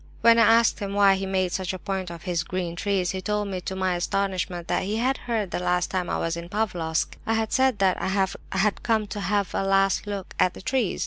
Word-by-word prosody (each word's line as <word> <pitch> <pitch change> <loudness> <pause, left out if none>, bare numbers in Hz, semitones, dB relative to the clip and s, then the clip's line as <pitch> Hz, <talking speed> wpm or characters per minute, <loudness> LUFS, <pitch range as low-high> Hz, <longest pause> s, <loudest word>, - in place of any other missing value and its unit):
When 230 0 +6
I 230 0 +7
asked 230 0 +2
him 200 -1 -4
why 200 -1 +6
he 195 0 -2
made 185 -1 0
such 190 +1 -2
a - - -4
point 190 -2 -4
of 170 -1 -9
his 175 -3 -1
'green 175 0 -4
trees,' 185 -1 0
he 190 - -4
told 210 +1 -1
me, 185 -2 -4
to 190 - -5
my 185 -1 0
astonishment, 180 -1 -2
that - - +1
he 205 +3 -2
had 255 +4 +1
heard 215 -6 -1
that - - -2
last 180 0 0
time 185 -2 -1
I - - 0
was 165 0 -1
in 170 0 -7
Pavlofsk 175 -7 -1
I 225 - +2
had 220 -1 -1
said 260 -3 +3
that 190 -2 +2
I - - -1
had 195 +1 0
come 220 -2 +1
'to 205 0 -6
have 205 -1 0
a - - 0
last 195 +1 +2
look 200 -2 -5
at 180 - +3
the - - -9
trees. 255 -5 0
195 Hz, 250 wpm, -25 LUFS, 180-210 Hz, -, I